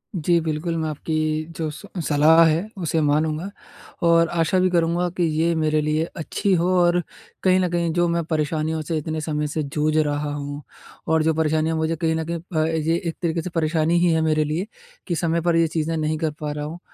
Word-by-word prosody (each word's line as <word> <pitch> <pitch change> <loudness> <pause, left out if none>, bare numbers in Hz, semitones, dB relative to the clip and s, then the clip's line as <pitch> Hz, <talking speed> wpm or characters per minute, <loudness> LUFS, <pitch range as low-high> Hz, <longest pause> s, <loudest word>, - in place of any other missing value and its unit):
जी, 170 0 +2
बिल्कुल 160 +1 -2
मैं 160 -1 -1
आपकी 155 +1 -3 0.4
जो 160 -2 -2
स 155 - -11 0.2
सलाह 155 +3 +6
है, 165 +5 +1
उसे 165 -3 -1
मानूँगा 155 +4 0 0.6
और 170 0 +5
आशा 170 +2 +1
भी 185 0 +3
करूँगा 175 0 +1
कि 175 - +2 0.2
ये 170 +1 +2
मेरे 155 -1 +1
लिए 150 +1 0
अच्छी 190 +4 -1
हो। 175 +1 +1
और 175 0 +3 0.4
कहीं 185 0 +4
न 180 -1 +1
कहीं 170 -1 0
जो 175 0 +2
मैं 170 0 0
परेशानियों 155 0 -1
से 160 +1 -2
इतने 155 +1 -3
समय 150 -1 -2
से 155 +1 -2
जूझ 155 0 +1
रहा 145 -1 0
हूँ 145 0 -5 0.5
और 160 0 +2
जो 160 +1 +2
परेशानियाँ 160 0 +1
मुझे 160 +1 0
कहीं 160 0 0
न 160 0 -2
कहीं 170 +1 -3
अ, 160 -2 -2
ये 160 0 0
एक 165 - -2
तरीके 165 -1 0
से 180 - -5
परेशानी 160 +1 +1
ही 175 0 +3
है 160 - +2
मेरे 155 -1 +2
लिए, 155 +6 -2 0.4
कि 175 - -1
समय 165 +1 0
पर 170 0 +1
ये 165 0 +4
चीज़ें 160 0 -2
नहीं 155 0 -1
कर 155 0 -1
पा 150 -1 -3
रहा 150 0 -4
हूँ। 160 +3 -7
160 Hz, 215 wpm, -22 LUFS, 155-170 Hz, 0.6 s, सलाह